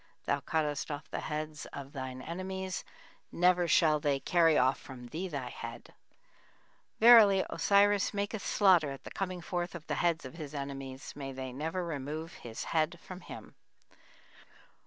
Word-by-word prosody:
Thou - - +1
cuttest 150 -2 -1
off 145 0 -5
the - - -2
heads 155 0 -4
of 140 0 -8
thine 130 -2 -6
enemies; 185 +1 -4 0.5
never 180 0 +3
shall 155 -1 +4
they 145 -2 +1
carry 165 0 +4
off 130 +1 +3
from 125 -2 -10
thee 170 +7 -4
thy 140 -7 -4
head - - -8 0.5
(?). - - -35
Verily 220 -4 +8
Osiris 205 -1 +3
maketh 205 +1 -2
slaughter 180 -7 +4
at 135 0 -8
the - - -9
coming 185 -2 -3
forth 175 +1 -3
of 165 -2 -8
the - - -3
heads 170 -4 +1
of 130 - -8
his 150 -3 -7
enemies; 135 -1 -6
may 135 -2 -5
they 130 -1 -6
never 160 +6 -3
remove 155 +1 -5
his 115 -1 -7
head 165 +2 0
from 185 +2 -10
him. - - -10
160 Hz, 160 wpm, -31 LUFS, 140-180 Hz, 0.5 s, Verily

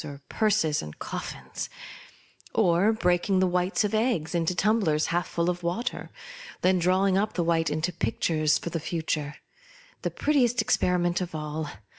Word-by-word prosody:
or 145 -2 -8
purses 210 -9 +1
and 75 0 -9
coffins; - - -6 0.9
or 180 +5 +4
breaking 185 -2 +1
the 185 - +4
whites 180 +3 +1
of 210 +1 -1
eggs 215 -9 0
into 170 +1 0
tumblers 190 -7 +2
half 175 +1 0
full 170 0 -1
of 180 0 -1
water, 180 +9 -2
and - - -10 0.5
then 185 0 +4
drawing 185 +2 +3
up 210 +1 -1
the 175 - 0
white 165 -1 +1
into 155 +4 -1
pictures 155 +3 +1
of 170 - -3
the 165 - -2
future 155 -2 -3 0.3
— - - -25
the - - -1
prettiest 255 -5 +1
experiment 180 -4 +1
of 180 -2 -4
all. 150 0 -4
175 Hz, 165 wpm, -27 LUFS, 160-205 Hz, 0.9 s, or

